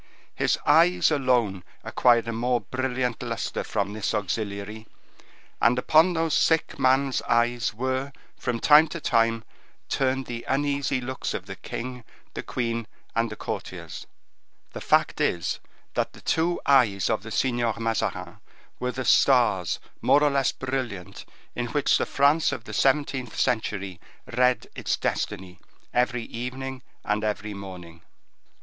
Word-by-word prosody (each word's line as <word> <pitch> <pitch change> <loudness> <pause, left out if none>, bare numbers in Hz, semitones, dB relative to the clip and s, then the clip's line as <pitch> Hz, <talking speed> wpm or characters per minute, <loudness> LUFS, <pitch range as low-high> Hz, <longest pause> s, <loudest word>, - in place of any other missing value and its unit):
His - - +1
eyes 170 +3 +5
alone 125 -10 +1 0.2
acquired 120 -2 +3
a 115 - -2
more 120 +2 +1
brilliant 125 -2 -2
luster - - -3
from 100 -1 -2
this 110 +1 -2
auxiliary, 105 +1 -3 0.7
and 120 +2 +4
upon 160 +7 +4
those 165 -2 0
sick 160 -3 +2
man's 135 0 +3
eyes 120 0 +2
were, 130 +4 -2 0.2
from 120 -1 -2
time 155 +3 +7
to 170 +2 -6
time, 115 -4 +2 0.5
turned 135 0 0
the 120 -1 -6
uneasy 140 -1 0
looks 130 +1 -4
of - - -5
the - - -7
king, 125 0 -6 0.3
the - - -4
queen, 115 -2 -3 0.3
and 115 0 +1
the 110 - -7
courtiers. - - -6 0.6
The - - -7
fact - - +2
is, 85 - 0 0.3
that - - -1
the - - -14
two 170 +2 +1
eyes 115 -9 +4
of 110 -3 0
the 110 - -9
Signor 120 -2 0
Mazarin 115 -1 -2 0.4
were 125 0 -1
the 130 0 -5
stars 120 - +4 0.2
more 145 - +4
or 145 - +4
less 135 -1 +2
brilliant 120 -8 -5 0.3
in 120 0 -3
which 145 +4 +2
the - - -1
France 145 +3 +3
of 120 - -5
the - - -9
seventeenth 135 -3 +1
century 100 -6 -1 0.4
read 125 0 +3
its - - -1
destiny 90 -1 -3 0.3
every 125 -1 +1
evening 130 +3 -6 0.2
and 105 +1 0
every 105 0 -2
morning. 90 -4 -10
125 Hz, 145 wpm, -25 LUFS, 110-135 Hz, 0.7 s, time